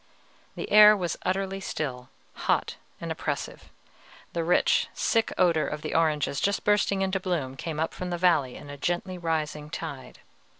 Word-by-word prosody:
The - - -6
air 210 0 +9
was 175 -4 -2
utterly 195 +1 -1
still, 130 -9 -4 0.2
hot - - -1 0.2
and - - -5
oppressive; - - -4 0.6
the 170 - -1
rich, 175 +2 +3
sick 225 -1 +1
odor 170 -4 +3
of 150 0 -5
the - - -4
oranges 155 -3 +1
just 200 0 0
bursting 200 -2 +2
into 190 0 0
bloom 165 -8 -2
came 155 +2 -5
up 160 - -1
from 180 - -5
the 175 - -2
valley 170 -8 +2
in 145 - -10
a 145 - -8
gently 175 +4 -2
rising 155 -3 -2
tide. 150 -5 -7
170 Hz, 165 wpm, -27 LUFS, 150-190 Hz, 0.6 s, air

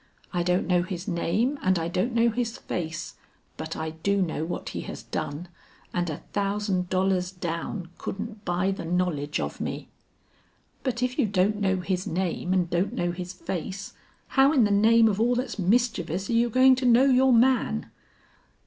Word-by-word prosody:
I 175 - +1
don't 180 +1 +1
know 180 -1 +3
his 180 0 -5
name 210 - 0
and 185 0 +2
I 165 0 -1
don't 185 +8 0
know 235 0 +4
his 230 0 -2
face, 160 -1 -5 0.4
but 160 +1 -5
I 160 0 -3
do 200 +5 0
know 165 -4 -1
what 175 - -4
he - - -5
has - - -7
done, 145 +5 -4 0.5
and 175 -1 0
a 150 - -6
thousand 200 -2 -1
dollars 185 -1 +1
down 175 0 -4
couldn't 210 +1 -6
buy 180 +1 0
the 195 - -5
knowledge 165 -4 -1
of - - -4
me." - - -4 0.9
"But 250 -2 -2
if 250 0 -1
you - - +3
don't 205 +2 +1
know 190 -2 +1
his 185 0 -2
name 180 +1 -2
and 185 -2 +2
don't 180 +6 0
know 175 -8 -1
his 180 +1 -6
face, 190 +2 -5 0.4
how 270 +1 +5
in 265 -6 +5
the 205 - +2
name 225 +3 +5
of 210 0 0
all 245 +2 +3
that's 250 -3 -3
mischievous 195 -3 +1
are - - +1
you 235 +1 +3
going 260 +3 +6
to 255 -1 0
know 245 +2 +6
your 265 0 +5
man?" 240 - +2
190 Hz, 185 wpm, -26 LUFS, 175-230 Hz, 0.9 s, going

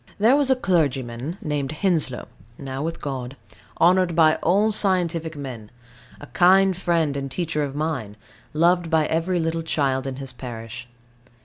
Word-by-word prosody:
There 225 +6 +5
was 285 -2 +2
a 265 - +5
clergyman 145 - -1
named 145 -1 -2
Henslow, 155 -7 -1 0.3
now 135 -1 -5
with 165 +2 -3
God, 135 -2 -5 0.4
honoured 180 0 +4
by 155 -2 +5
all 205 +6 +2
scientific 175 -6 0
men, 125 -7 -7 0.5
a - - -9
kind 190 +4 +4
friend 170 -5 0
and 135 -1 -4
teacher 160 +1 -2
of 140 -1 -3
mine, 145 -9 -3 0.3
loved 170 +2 +2
by 160 -2 +3
every 165 +3 0
little 165 0 -1
child 135 -4 -1
in 135 - -4
his 135 -1 -7
parish. 120 -1 -8
155 Hz, 150 wpm, -23 LUFS, 135-175 Hz, 0.5 s, There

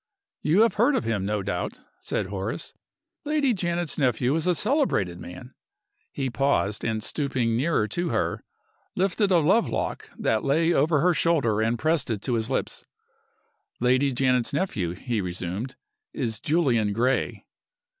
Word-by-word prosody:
"You 170 +7 +3
have 225 -3 +4
heard 265 +4 +4
of - - 0
him, 105 -4 -1
no 105 -1 -1
doubt," 90 -3 -3 0.2
said - - -2
Horace. 100 - -4 0.5
"Lady 295 -4 +1
Janet's 175 -5 -2
nephew 125 -1 +2
is 160 +2 0
a 180 - +3
celebrated 205 - 0
man." 90 +9 -10 0.6
He 135 - -2
paused, 120 -7 0
and 110 -2 -1
stooping 130 -4 -1
nearer 130 -3 +1
to 175 - -2
her, - - -1 0.5
lifted 195 +2 +1
a 180 - +5
love 185 +9 +3
lock - - -3
that 110 -1 0
lay 165 +5 +2
over 150 +1 +3
her 180 +2 +4
shoulder 140 -11 +2
and 115 +2 +1
pressed 155 0 +1
it 105 -3 -2
to 125 - -1
his 115 0 -1
lips. 135 - -2 1.0
"Lady 130 +3 +3
Janet's 125 -1 +1
nephew," 105 - -1
he 115 +2 -2
resumed, 90 +7 -4 0.4
"is 115 -5 -2
Julian 125 -10 +1
Gray." 125 +5 0
130 Hz, 155 wpm, -25 LUFS, 110-170 Hz, 1.0 s, a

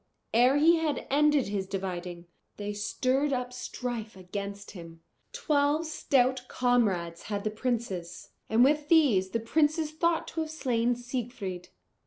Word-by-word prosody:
ere 250 +4 +5
he 330 +3 +5
had 310 -4 -1
ended 295 -2 +3
his 195 -2 -2
dividing, 180 -3 -5 0.3
they 205 0 -4
stirred 255 +7 0
up 250 -1 -2
strife 240 -4 -5
against 200 +2 -6
him. 165 -3 -11 0.3
Twelve 295 +2 +1
stout 260 -4 +1
comrades 200 -10 +1
had 200 -1 -2
the 215 - -1
princes, 215 -7 -3 0.2
and 225 +2 +5
with 295 +2 +3
these 260 - +4
the 230 - -1
princes 305 +6 +1
thought 330 +1 0
to 325 - -5
have 315 - -3
slain 245 -6 0
Siegfried. 240 -7 -5
245 Hz, 140 wpm, -29 LUFS, 200-290 Hz, 0.3 s, ere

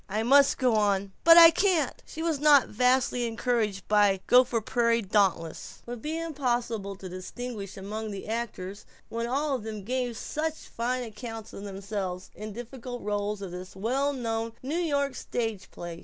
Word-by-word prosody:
'I 215 +3 -1
must 275 +3 +5
go 255 -3 +2
on.' 200 -2 +1
But 330 0 +9
I 335 -1 +11
can't!" 350 -7 +1
She 320 - -6
was 325 -4 0
not 290 -3 +6
vastly 250 +1 +2
encouraged 225 -3 -1
by 205 -1 +5
the 195 - -7
Gopher 250 -1 +5
Prairie 230 +1 +1
Dauntless:... 190 -5 0
would 240 -1 -7
be 310 +4 -3
impossible 240 -10 -2
to 190 0 -9
distinguish 200 +3 -7
among 215 +3 -5
the 200 -1 -7
actors 210 -3 -5 0.2
when 230 +1 -3
all 275 +1 0
gave 225 +3 -3
such 315 +5 -2
fine 250 -2 -3
account 225 0 -8
of 200 - -8
themselves 195 -2 -5
in 215 0 -7
difficult 245 +2 -7
roles 205 0 -2
of 190 - -6
this 180 +1 -8
well 260 +8 0
known 230 -3 -3
New 300 +6 -1
York 285 -5 0
stage 225 -5 -4
play. 170 -1 -8
230 Hz, 165 wpm, -28 LUFS, 205-255 Hz, 0.2 s, I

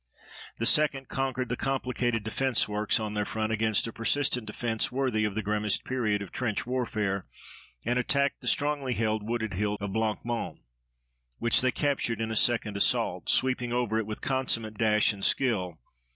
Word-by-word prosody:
The 115 - -1
2d 140 -1 +2
conquered 130 -1 -1
the 125 - 0
complicated 125 -4 -1
defense 125 +3 +1
works 105 +1 +1
on 105 -1 -3
their 105 -1 0
front 110 +1 -2
against 110 -1 +2
a 115 - -5
persistent 125 -1 +1
defense 110 +1 -1
worthy 125 -5 0
of 105 -2 -2
the 110 - -1
grimmest 105 0 0
period 110 -6 0
of 100 - -10
trench 115 -5 -2
warfare 110 -6 -2 0.6
and 120 +2 +1
attacked 140 +2 +1
the - - -8
strongly 145 -4 +1
held 110 -1 0
wooded 110 0 -2
hill 105 +2 -1
of 100 -1 -4
Blanc 110 0 -1
Mont, 120 -1 -3 0.8
which 120 0 +3
they 130 - +3
captured 130 -4 -1
in 110 0 -2
a - - -2
second 110 -3 +2
assault, - - +1
sweeping 125 -2 +2
over 120 -3 0
it 110 - -3
with 110 - -5
consummate 125 -5 0
dash 105 0 +3
and 100 -1 -9
skill. 95 -10 +1
115 Hz, 175 wpm, -28 LUFS, 105-125 Hz, 0.8 s, which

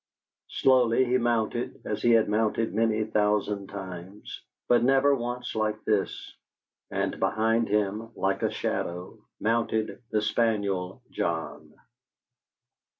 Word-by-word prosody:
Slowly 130 -1 +3
he 125 +1 +2
mounted 120 +1 -1
as - - -3
he 120 - +3
had 115 -1 +4
mounted 110 +1 0
many 110 0 +2
thousand 105 -2 0
times, 95 0 -8 0.3
but 120 -1 +4
never 135 +2 +4
once 125 -1 -3
like 110 0 -1
this, 105 -3 -1 0.6
and - - -2
behind 115 +1 +1
him, 105 +2 0
like 95 0 0
a - - +2
shadow, 90 +1 -3 0.2
mounted 110 0 0
the 105 -1 0
spaniel 100 -5 0
John. 80 -2 -3
110 Hz, 115 wpm, -27 LUFS, 100-120 Hz, 0.6 s, had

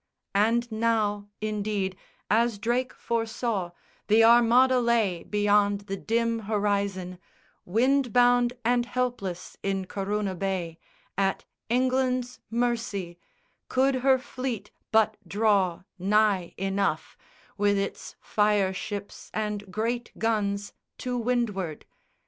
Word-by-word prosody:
And 230 +4 +2
now, 215 -2 0
indeed, 210 -3 -2 0.3
as 230 0 +2
Drake 240 +5 0
foresaw, 225 -4 -2 0.4
The 220 +2 +5
Armada 240 +3 +6
lay, 225 -7 +1
beyond 205 -1 +2
the 200 -1 -5
dim 230 +3 0
horizon, 200 -4 -1 0.5
Wind 250 +6 +2
bound 245 0 +4
and 240 0 +2
helpless 245 -8 -3
in 195 -1 -1
Corunna 200 +1 -2
bay, 180 -3 -3 0.4
At 195 -1 0 0.2
England's 255 0 +1
mercy, 225 -7 -2 0.5
could 265 +1 +2
her 265 +1 +4
fleet 255 -5 -5 0.2
but 220 -1 +3
draw 200 -3 +2 0.2
Nigh 200 -2 +2
enough, 195 -4 -1 0.4
with 205 0 +2
its 195 0 -4
fire 210 -2 +2
ships 205 +1 -6
and 210 -2 -3
great 230 +4 -2
guns 205 -3 -1 0.2
To 250 -1 -3
windward. 225 -9 -1
215 Hz, 105 wpm, -27 LUFS, 200-240 Hz, 0.5 s, Armada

